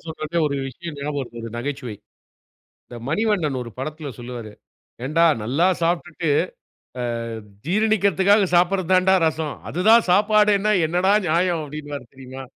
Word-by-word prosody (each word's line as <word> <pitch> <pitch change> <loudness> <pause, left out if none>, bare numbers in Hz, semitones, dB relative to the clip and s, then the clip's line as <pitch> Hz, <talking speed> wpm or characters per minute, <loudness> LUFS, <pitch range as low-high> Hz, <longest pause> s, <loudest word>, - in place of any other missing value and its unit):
சொல்றது 160 +1 -5
ஒரு 140 -1 -2
விஷயம் 160 +3 -8
ஞாபகம் 145 +1 -4
வருது 120 -2 -8
ஒரு 115 - -5
நகைச்சுவை. 130 -2 -4 0.9
இந்த 120 - -12
மணிவண்ணன் 175 -7 0
ஒரு 120 - -7
படத்துல 150 +2 -5
சொல்வாரு, 120 -3 -7 0.5
"ஏன்டா, 165 +4 +3 0.2
நல்லா 145 +11 +2
சாப்புட்டுட்டு 170 -1 -1 0.7
ஆ - - -2 0.6
ஜீரணிக்கறதுக்காக 200 0 +3
சாப்புடுறது 180 +1 +2
தான்டா 185 +1 +4
ரசம். 160 -2 -2 0.2
அதுதான் 215 +8 +4
சாப்பாடேன்னா 210 +1 +4
என்னடா 180 +4 +2
நியாயம்" 170 0 +1
அப்டின்பார் 145 -4 -8
தெரியுமா? 130 0 -9
165 Hz, 125 wpm, -22 LUFS, 140-190 Hz, 0.9 s, தான்டா